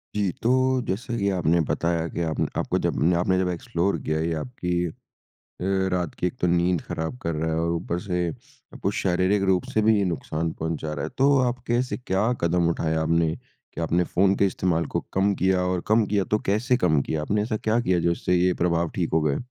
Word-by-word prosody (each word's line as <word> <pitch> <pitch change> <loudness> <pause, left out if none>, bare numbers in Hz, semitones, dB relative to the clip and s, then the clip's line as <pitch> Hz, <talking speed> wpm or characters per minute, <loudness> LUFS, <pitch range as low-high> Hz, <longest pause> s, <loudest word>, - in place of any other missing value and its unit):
जी। 100 -3 +1
तो 115 - +2 0.4
जैसा 120 +5 -3
कि 100 -1 +1
आपने 85 -2 +2
बताया 85 -1 0
कि - - -1
आपने - - -1
आपको - - 0
जब 85 +3 +2
आपने 95 +1 +1
जब 90 - +1
एक्सप्लोर 90 +2 -1
किया 80 0 -1
ये 80 +1 0
आपकी 90 -4 -5 0.2
अ, 80 - -7 1.0
रात 90 -3 -1
की 90 - 0
एक - - -6
तो 90 - +3
नींद 85 0 +2
खराब 80 +9 -4
कर 85 -1 -1
रहा 80 +1 -1
है 80 - 0
और 85 0 0
ऊपर 85 +1 -2
से 90 -2 -2 0.5
आपको 100 - -2
शारीरिक 95 +2 +2
रूप 90 -1 +3
से 110 - +3
भी 110 - +5
ये 100 - +1
नुकसान 80 0 -3
पहुँचा 80 -1 -3
रहा 70 - -4
है। - - -5
तो 140 +1 +4
आप 125 +1 -2
कैसे 120 +2 0
क्या 95 -6 -1 0.2
कदम 85 0 +2
उठाया 80 -1 0
आपने 80 0 +1
कि - - -12
आपने 85 +2 +1
फ़ोन 95 +2 +4
के 100 - +3
इस्तेमाल 90 -3 0
को - - +2
कम 100 +1 +2
किया 95 0 +3
और 90 -1 0
कम 110 0 +4
किया 100 -1 +1
तो 105 - +3
कैसे 120 +5 +2
कम 80 - +2
किया? 75 +2 -2
आपने 105 +7 0
ऐसा 110 +1 -1
क्या 110 +2 +1
किया 95 -7 +1
जिससे 85 +1 +1
ये 90 +1 +3
प्रभाव 85 -1 +1
ठीक - - -1
हो 80 - +3
गए? 75 -2 +1
90 Hz, 220 wpm, -25 LUFS, 85-100 Hz, 1.0 s, भी